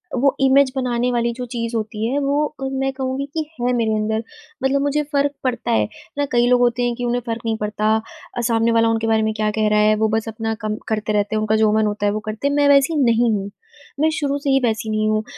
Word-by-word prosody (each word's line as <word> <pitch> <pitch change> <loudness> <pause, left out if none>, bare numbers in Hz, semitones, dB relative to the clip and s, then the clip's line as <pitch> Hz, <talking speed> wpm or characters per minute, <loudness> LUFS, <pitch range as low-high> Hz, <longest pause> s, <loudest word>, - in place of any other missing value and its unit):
वो 275 +2 +2
इमेज़ 270 0 +4
बनाने 250 -1 0
वाली 235 -1 0
जो 250 - -4
चीज़ 230 -1 -3
होती 215 0 -3
है 280 - +1
वो 290 +2 0 0.2
मैं 270 0 0
कहूँगी 265 +1 -3
कि 315 -1 -2 0.2
है 250 +1 +1
मेरे 230 -2 +1
अंदर। 220 +1 -1 0.4
मतलब 275 +1 +2
मुझे 285 +1 0
फ़र्क 285 0 +2
पड़ता 255 -2 -1
है, 105 -1 +2 0.3
ना 285 - +1
कई 240 0 +3
लोग 250 0 +4
होते 245 0 +2
हैं 240 -1 0
कि 245 0 -4
उन्हें 245 +1 0
फ़र्क 230 0 -3
नहीं 225 -1 0
पड़ता 215 +1 +1 0.4
अ, - - 0
सामने 230 -1 +2
वाला 230 0 +3
उनके 225 0 0
बारे 220 -1 +3
में 220 0 0
क्या 215 -1 0
कह 215 0 0
रहा 210 0 +3
है, 215 0 +4
वो 220 +1 +1
बस 220 +1 -1
अपना 225 0 -3
कम 215 0 -2
करते 215 -1 -1
रहते 205 +1 0
हैं, - - +1
उनका 215 0 +1
जो 215 -1 +3
मन 215 0 +2
होता 205 0 -2
है - - +2
वो 215 - -2
करते 220 +6 -2
हैं, 285 - 0
मैं 290 0 +3
वैसी 280 +3 +4
नहीं 235 -1 +3
हूँ। 200 -1 -2 0.5
मैं 315 - +4
शुरू 285 -3 -1
से 285 0 -2
ही 270 0 +4
वैसी 220 -2 -1
नहीं 215 0 0
हूँ, 215 0 +1
230 Hz, 260 wpm, -20 LUFS, 215-265 Hz, 0.5 s, इमेज़